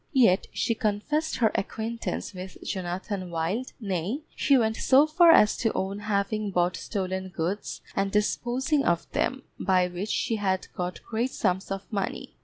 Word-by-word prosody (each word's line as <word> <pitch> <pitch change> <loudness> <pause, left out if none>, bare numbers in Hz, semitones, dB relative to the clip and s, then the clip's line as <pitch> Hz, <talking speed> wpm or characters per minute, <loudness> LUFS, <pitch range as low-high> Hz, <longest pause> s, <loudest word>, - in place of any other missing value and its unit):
Yet 225 -8 +4
she 230 - 0
confessed 235 +9 -1
her 225 -4 +3
acquaintance 225 +4 -3
with 185 0 -8
Jonathan 185 0 -3
Wild, 170 +10 -2
nay, 200 - -2
she 275 - +4
went 220 -2 +2
so 275 +3 +5
far 335 +3 +5
as 210 -9 +6
to 225 - +1
own 195 +2 -2
having 210 0 -1
bought 180 -1 +1
stolen 190 -2 -3
goods, 185 +3 -3
and 195 0 0
disposing 250 +7 +1
of 170 -1 +1
them, 265 0 -1 0.2
by 185 -1 +3
which 180 +4 -5
she 225 - 0
had 190 -2 0
got 180 0 -4
great 235 +3 -1
sums 190 -6 -1
of 195 0 -3
money. 195 -2 -3
205 Hz, 160 wpm, -27 LUFS, 185-230 Hz, 0.2 s, as